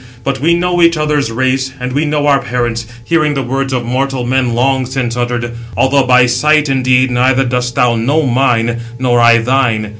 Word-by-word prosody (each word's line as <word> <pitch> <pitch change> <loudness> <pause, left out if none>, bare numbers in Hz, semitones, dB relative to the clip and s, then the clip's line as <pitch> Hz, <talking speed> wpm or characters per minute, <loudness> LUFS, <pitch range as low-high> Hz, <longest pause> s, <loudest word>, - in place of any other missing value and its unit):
But 135 -1 -2
we 165 +5 +2
know 175 0 0
each 170 -1 +3
other's 150 -5 -1
race, 130 +2 -1
and 125 0 -4
we 145 +3 0
know 150 -1 -1
our 140 -2 +3
parents, 120 -2 -3 0.2
hearing 155 +1 0
the 135 - -2
words 135 +2 -3
of 125 -2 -2
mortal 130 +1 -2
men 125 -1 0
long 130 +1 0
since 125 -2 -3
uttered; 120 -1 -3 0.3
although 135 0 +2
by 125 0 +5
sight, 150 +5 +1
indeed, 130 -1 +1
neither 130 +2 +2
dost 125 0 -2
thou 125 -3 +2
know 140 +8 0
mine, 120 -3 0 0.2
nor 125 -1 +1
I 120 0 +5
thine. 115 -3 0
130 Hz, 190 wpm, -13 LUFS, 120-135 Hz, 0.3 s, by